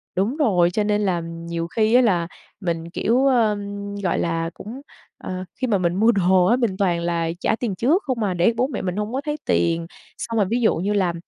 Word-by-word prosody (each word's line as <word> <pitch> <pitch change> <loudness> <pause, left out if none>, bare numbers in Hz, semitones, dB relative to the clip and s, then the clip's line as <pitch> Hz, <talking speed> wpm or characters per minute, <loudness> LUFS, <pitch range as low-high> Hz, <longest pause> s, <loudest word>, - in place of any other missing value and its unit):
Đúng 215 - 0
rồi, 180 - +3
cho 210 - 0
nên 210 0 +1
là, 190 -3 +1
ừm, 165 0 -6
nhiều 170 0 -3
khi 220 +5 +1
á 250 - +7
là 175 -8 +2 0.3
mình, 170 -2 -3
kiểu, 240 +8 +1
ưm, 205 -4 0
gọi 190 -4 -1
là, 165 -1 -1
cũng, 240 +7 -9 0.4
ờ 185 0 -5 0.2
khi 255 - +1
mà 205 -4 +2
mình 175 -1 0
mua 225 +4 +4
đồ 185 -3 +3
á 235 - +4
mình 225 -7 -1
toàn 175 -4 +1
là 170 -1 -1
trả 220 - +1
tiền 225 -5 -3
trước 295 - +2
không 250 -6 -2
à 195 - 0
để 180 +6 +2
bố 250 +3 +1
mẹ - - -4
mình 180 -1 -3
hông 210 +3 -3
có 270 - -1
thấy 295 0 -1
tiền. 165 0 +1 0.3
Xong 230 -1 -4
rồi 205 - +3
ví 240 +2 +1
dụ 220 - +3
như 200 +5 -1
là 185 -4 +1
200 Hz, 240 wpm, -22 LUFS, 175-230 Hz, 0.4 s, á